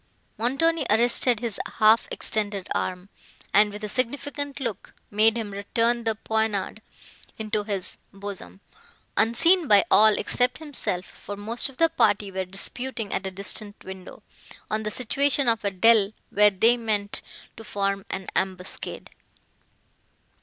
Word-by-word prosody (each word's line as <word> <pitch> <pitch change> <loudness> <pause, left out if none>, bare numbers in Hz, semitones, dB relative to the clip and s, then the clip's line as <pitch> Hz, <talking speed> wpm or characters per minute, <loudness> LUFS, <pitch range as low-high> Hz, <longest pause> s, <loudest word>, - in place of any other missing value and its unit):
Montoni 295 +8 +1
arrested 235 +1 +4
his 230 -4 -3 0.2
half 220 +1 +5
extended 205 -3 -1
arm, 185 +1 -3 0.4
and, 210 +1 +5
with 210 +1 -8
a - - -2
significant 285 +5 -3
look, 230 -7 -5 0.2
made 220 +2 +4
him 220 -3 -4
return 230 +4 0
the 225 -1 0
poniard 220 -1 -2 0.6
into 215 -1 -2
his 200 -3 -4
bosom, 200 -1 -9 0.5
unseen 325 +10 +4
by 205 -3 +6
all 215 0 +6
except 250 0 0
himself; 275 - -2
for 205 +1 -10
most 225 +6 -2
of 265 - -16
the 330 - +5
party 205 -11 +1
were 190 0 -3
disputing 220 +4 -3
at 190 - -2
a - - -2
distant 200 +2 -2
window, 190 -1 -10 0.5
on 215 0 0
the 215 - -3
situation 275 +4 +1
of 225 -2 +2
a 200 - +1
dell 205 +2 +4 0.2
where 210 0 +5
they 225 +5 +3
meant 210 -3 -1 0.3
to 225 - -11
form 200 -2 -2
an 190 0 -5
ambuscade. 185 -1 -3
215 Hz, 140 wpm, -25 LUFS, 200-240 Hz, 0.6 s, by